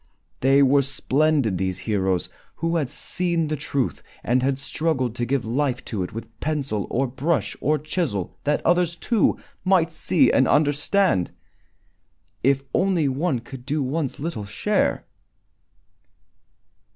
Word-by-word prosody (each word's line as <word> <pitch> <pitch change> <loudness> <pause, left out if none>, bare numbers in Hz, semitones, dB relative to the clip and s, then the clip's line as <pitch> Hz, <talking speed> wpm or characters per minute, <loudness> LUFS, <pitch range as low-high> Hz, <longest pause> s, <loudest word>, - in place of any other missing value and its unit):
They 135 +2 +5
were 140 +1 +5
splendid, 140 - +1
these 95 -1 -1
heroes 95 -2 0 0.3
who 165 +1 0
had 145 -6 -1
seen 170 0 -1
the 155 - 0
truth 140 -2 -2 0.2
and 125 +2 +2
had 135 +1 +1
struggled 140 -3 -1
to 120 - 0
give 135 -2 0
life 130 +2 -1
to 105 -4 -3
it 90 - -3
with 115 +1 -9
pencil 140 -9 -2
or 135 +3 +1
brush 135 +5 -1
or 150 +3 +2
chisel, 145 - -2
that 150 0 0
others, 175 0 +3
too, 225 +4 +1 0.3
might 185 -3 +3
see 165 +2 +3
and 130 - +4
understand. 145 - +2 1.1
If 135 +1 +2
only 185 -6 +2
one 135 -1 0
could 125 +1 -10
do 145 +2 -1
one's 140 +1 -2
little 145 -9 -4
share! 205 - 0
140 Hz, 140 wpm, -23 LUFS, 120-160 Hz, 1.1 s, They